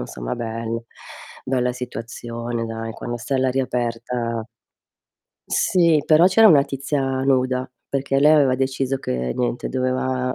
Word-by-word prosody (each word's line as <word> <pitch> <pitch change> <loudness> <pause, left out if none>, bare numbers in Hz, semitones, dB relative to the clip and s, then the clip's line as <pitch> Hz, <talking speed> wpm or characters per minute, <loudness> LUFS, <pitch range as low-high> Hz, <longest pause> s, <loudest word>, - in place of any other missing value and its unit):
insomma, - - -5
bel 115 0 -4 0.6
bella 125 -1 0
situazione, 120 -1 -5
dai. 115 0 -5
Quando 120 +1 -5
stai 135 +3 -2
all'aria 130 0 +1
aperta 115 -1 -2 1.1
Sì, 165 -4 +3
però 160 +3 +6
c'era 205 +4 +6
una 145 -4 +6
tizia 140 +1 -2 0.2
nuda, 130 -1 +1 0.2
perché 135 0 0
lei 150 +2 +6
aveva 140 -4 +4
deciso 135 0 -1
che 60 - -2
niente 125 -1 -2
doveva 130 0 -1
125 Hz, 130 wpm, -22 LUFS, 115-135 Hz, 1.1 s, però